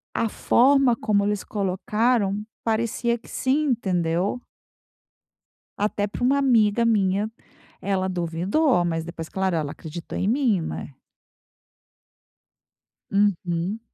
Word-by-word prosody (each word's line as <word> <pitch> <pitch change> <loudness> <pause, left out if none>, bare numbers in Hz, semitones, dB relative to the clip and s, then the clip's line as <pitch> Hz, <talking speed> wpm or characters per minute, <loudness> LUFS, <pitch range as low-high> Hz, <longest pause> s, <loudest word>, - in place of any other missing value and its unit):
a 230 - +1
forma 265 +2 +4
como 210 -2 +1
eles 205 -1 -1
colocaram 205 +2 0 0.2
parecia 230 +1 0
que - - -18
sim, 280 +4 0
entendeu?" 185 -1 0 1.4
Até 205 0 0
para 225 - -4
uma 275 +3 +3
amiga 235 -4 +3
minha, 210 -1 +1 0.5
ela 190 -1 -1
duvidou, 180 - +1
mas 165 -1 -1
depois 165 -1 -7
claro 190 -1 -1
ela 155 -3 -1
acreditou 160 +3 -7
em 190 - 0
mim, 235 -5 +2
né. 160 - -6 2.2
Uhum. 195 0 0
205 Hz, 110 wpm, -24 LUFS, 180-235 Hz, 2.2 s, forma